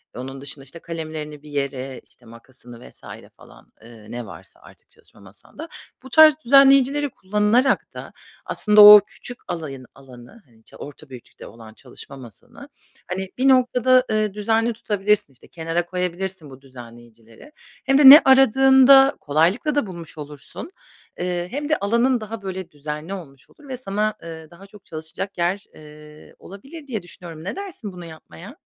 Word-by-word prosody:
onun 135 +2 -8
dışında, 140 0 -10
işte, 145 +5 -13
kalemlerini 155 -3 -8
bir 150 - -14
yere, 135 -2 -5
işte, 120 - -24
makasını 120 +1 -15
vs. - - -19 0.4
falan, - - -19
ııı, 115 -2 -15
ne 120 0 -7
varsa - - -14
artık - - -20
çalışma - - -24
masanda. 105 - -14 0.3
Bu 265 - -12
tarz 310 +2 +6
düzenleyicileri 275 +2 +4
kullanarak 210 +5 0
da - - -11 0.3
aslında 210 0 +3
o 210 0 +11
küçük 245 +2 -9
alayın 140 -6 -7
alanı, 130 - -16
hani, 115 -3 -27
ça - - -17
orta 145 +1 -12
büyüklükte 125 -2 -13
olan 110 -1 -14
çalışma 140 - -14
masanı, 120 -5 -15 0.4
hani, 190 +1 -5
bir 260 - +1
noktada, 255 -1 +3
ııı, 215 -2 -1
düzenli 225 +3 -1
tutabilirsin. 210 -7 -1
İşte, 125 - -18
kenara 165 +1 -4
koyabilirsin 180 -2 -5
bu 135 0 -15
düzenleyicileri. 120 - -16 0.3
Hem 270 0 +2
de 280 -2 +9
ne 295 +4 +11
aradığında 270 +1 +5
kolaylıkla 170 - 0
da 285 -8 -1
bulmuş 170 -3 -11
olursun. 150 - -8 0.5
Eee, 175 0 -3
hem 290 +2 -5
de 305 - +1
alanın 235 +4 0
daha 215 0 -8
böyle 190 -2 -7
düzenli 150 +4 -7
olmuş 140 -9 -12
olur 295 -2 -20
ve 260 - -6
sana, 215 -2 -2
ııı, 160 -1 -11
daha 190 +4 -16
çok 205 -1 -18
çalışacak 160 +5 -8
yer, 180 +3 -2
eee, 150 0 -16
olabilir 275 - -13
diye 220 -7 -5
düşünüyorum. 170 -2 -12
Ne 190 - -6
dersin 345 - -8
bunu 175 -1 -11
yapmaya? 160 - -13
180 Hz, 160 wpm, -21 LUFS, 140-235 Hz, 0.5 s, o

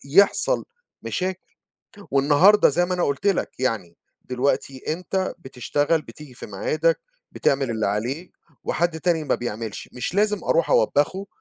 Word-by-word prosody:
يحصل 200 - +4 0.4
مشاكل، 185 0 -3 0.7
والنهاردة 145 +10 +5
زي 175 +5 +2
ما 180 - -1
أنا 180 - 0
قُلت 140 +8 -2
لَك، 195 -9 0
يعني 110 -9 -1 0.3
دلوقتي 130 +2 -1
أنت 185 +3 -2
بتشتغل 145 +2 -1
بتيجي 145 -5 -12
في - - -8
ميعادك، 155 +11 0 0.3
بتعمل 135 -2 +1
اللي 110 -1 -1
عليك 120 - -3 0.3
وحد 170 -1 0
تاني 165 -2 +1
ما - - +1
بيعملش، 115 -2 -5
مش 125 +7 -4
لازم 210 +1 +1
أروح - - +2
أوبّخه 195 - +2
155 Hz, 135 wpm, -23 LUFS, 130-185 Hz, 0.7 s, والنهاردة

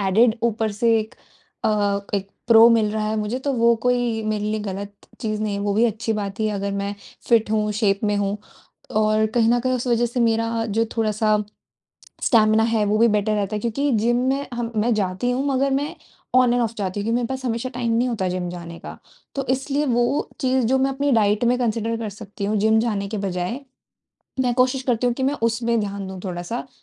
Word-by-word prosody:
Added 215 +4 +3
ऊपर 225 -2 0
से 225 +2 +2
एक 220 0 -5 0.5
अ, 205 -2 +1
एक 195 -1 -2 0.2
प्रो 230 0 +8
मिल 220 -2 +3
रहा 215 -1 -1
है 215 - -1
मुझे 215 +3 -2
तो 285 - +1
वो 235 -2 +4
कोई 245 -2 +1
मेरे 215 -1 -2
लिए 215 +1 -1
गलत 200 0 -5 0.3
चीज़ 215 -2 -2
नहीं 210 -1 -1
है। 200 - -3
वो 205 0 0
भी 225 - +3
अच्छी 225 0 -1
बात 200 -1 -4
ही 215 - +2
है 210 - -2
अगर 200 0 -2
मैं 200 0 -3 0.3
फिट 225 -3 +3
हूँ, 215 -1 +1
शेप 205 -2 +1
में 205 0 +1
हूँ। 200 0 -1 0.5
और 215 0 +2
कहीं 230 -2 +3
न 240 0 +3
कहीं 255 +1 0
उस 250 0 -3
वजह 240 0 +2
से 240 +1 -3
मेरा 230 0 +1
जो 225 +1 +1
थोड़ा-सा 215 -1 +2 0.9
स्टैमिना 220 -2 +4
है 225 -2 +1
वो 210 +1 +1
भी 230 +1 +5
बेटर 210 0 +1
रहता 205 0 -1
है। - - -3
क्योंकि 260 +6 -1
जिम 235 +3 +2
में 275 +1 0
हम 235 -1 -3
मैं 230 +3 +2
जाती 200 +4 -1
हूँ 255 +2 -1
मगर 275 0 +1
मैं 290 - -4 0.4
ऑन 255 -1 +5
एंड 245 0 +2
ऑफ 230 0 -2
जाती 200 -1 -3
हूँ - - -3
क्योंकि 225 - -1
मेरे 245 -1 0
पास 265 +1 -5
हमेशा 235 +1 -2
टाइम 235 -2 -1
नहीं 240 +2 +2
होता 210 -6 -1
जिम 180 0 -3
जाने 170 -1 -8
का। - - -10 0.4
तो 275 -1 -3
इसलिए 275 +3 0
वो 240 +3 +1
चीज़ 260 -2 +1
जो 265 +3 +2
मैं 265 +1 +2
अपनी 280 +1 -1
डाइट 210 0 +3
में 245 +1 +2
कंसीडर 230 -1 -1
कर 225 -2 -4
सकती 205 0 -8
हूँ 210 +2 0
जिम 220 +2 +3
जाने 205 -4 -1
के 215 0 -4
बजाय 180 +7 -3 0.8
मैं 250 -1 +1
कोशिश 255 +1 +2
करती 245 -1 +1
हूँ 245 - +1
कि 265 - -3
मैं 275 +2 +2
उसमें 230 0 +1
ध्यान 200 -2 -4
दूँ 190 0 -7
थोड़ा-सा। 185 +7 -4
225 Hz, 225 wpm, -22 LUFS, 210-240 Hz, 0.9 s, प्रो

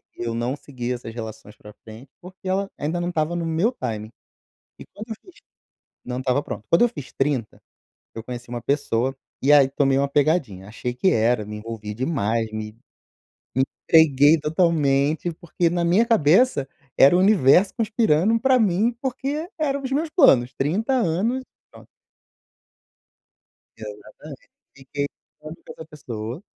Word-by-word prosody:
eu 115 -1 -4
não 120 +3 -2
segui 125 -4 -6
essas 120 -2 -7
relações 110 -2 -9
para 105 0 -14
frente, 115 +5 -12
porque 185 +1 -12
ela 195 +1 -1
ainda 160 +4 -2
não 175 - -2
estava 160 0 -1
no 170 -1 -2
meu 165 +8 +1
timing. 110 - -5 0.7
E - - -10
quando 215 +3 -11
eu 220 - -2
fiz 370 - -18 0.7
não 125 0 -4
estava 130 +2 0
pronto. 110 - -8
Quando 170 - +4
eu 240 - +5
fiz 145 - -10
30, 135 -5 -2 0.5
eu 115 - -7
conheci 120 -1 -8
uma 120 0 -5
pessoa, 135 -2 0 0.3
e 140 - +4
aí 140 -2 +6
tomei 135 0 +1
uma 140 - +1
pegadinha, 140 - 0
achei 120 +2 -5
que 180 +9 +1
era, 115 0 +1
me 105 +1 -7
envolvi 110 -1 -7
demais, 115 -4 -1
me 110 0 -6 0.8
me 130 - +3 0.3
entreguei 155 -1 +5
totalmente 155 -1 +1
porque 170 +1 -2
na 175 +1 0
minha 180 +7 +3
cabeça 185 - +3 0.3
era 140 +6 +6
o - - +4
universo 190 -2 +4
conspirando 220 -3 +2
para 260 0 +3
mim, 215 +4 +1
porque 275 +5 -3
eram 280 -2 -1
os 265 -1 -5
meus 305 +4 0
planos, 135 - +4
30 190 - -1
anos, 230 +3 0 0.3
pronto. - - -16 1.9
Exatamente. - - -11 0.3
Fiquei 140 +1 -4 0.3
com 155 0 -10 0.2
essa 160 - -10
pessoa 120 - -7
150 Hz, 155 wpm, -23 LUFS, 125-190 Hz, 1.9 s, aí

